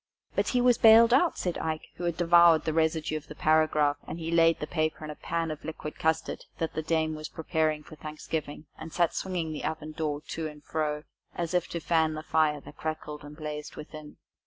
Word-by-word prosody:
"But - - 0
he 250 - +2
was 245 -1 +4
bailed 230 +1 +8
out," 330 +6 +4
said 180 -2 -2
Ike, 160 -1 -3
who 175 - -4
had 170 -2 -1
devoured 170 -1 +6
the 160 - 0
residue 160 -1 +1
of 155 - -10
the 150 - -9
paragraph, 155 -2 +3
and 170 - -5
laid 165 0 +3
the - - -3
paper 155 -1 -2
in 150 - -5
a - - -8
pan 165 0 -2
of 155 - -7
liquid 155 -1 -7
custard 160 0 -1
that 165 - -2
the 155 - -2
dame 160 0 0
was 155 0 -6
preparing 155 -1 -1
for 155 - -12
Thanksgiving, 155 0 -5
and 160 +1 -8
sat 170 0 +1
swinging 175 -4 -2
the 150 - -6
oven 155 -1 -3
door 155 -2 -2
to 160 -1 -3
and 150 -1 -11
fro 150 -1 -2 0.3
as 170 0 -3
if 180 -1 +1
to 170 - -4
fan 160 -1 +1
the 155 - -6
fire 155 -2 +2
that 145 - -13
crackled 150 -2 -5
and 145 +1 -11
blazed 150 -1 -6
within. 150 0 -10
160 Hz, 215 wpm, -28 LUFS, 155-165 Hz, 0.3 s, bailed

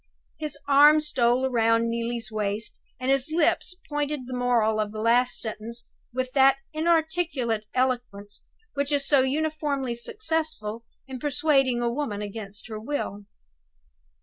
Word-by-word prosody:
His 305 -1 -4
arm 295 +2 +7
stole 255 -4 +2
round 230 -1 +3
Neelie's 230 -1 -2
waist, 210 0 -2 0.2
and 260 +1 0
his 275 +2 +2
lips 345 +2 +2
pointed 295 -1 -2
the 255 - -7
moral 240 -3 +2
of 210 -1 -1
the 215 - -6
last 240 +3 +3
sentence 230 +1 -5 0.3
with 255 +1 -2
that 270 0 +5 0.2
inarticulate 315 -8 0
eloquence 245 -6 -1 0.3
which 280 +1 -1
is 280 -1 +2
so 280 -3 +5
uniformly 285 -2 -1
successful 310 - -2 0.2
in 260 -1 -7
persuading 270 -3 +2
a 235 - +2
woman 225 -7 -3
against 205 0 -6
her 215 -2 -6
will. 215 -5 -4
255 Hz, 135 wpm, -26 LUFS, 230-290 Hz, 0.3 s, arm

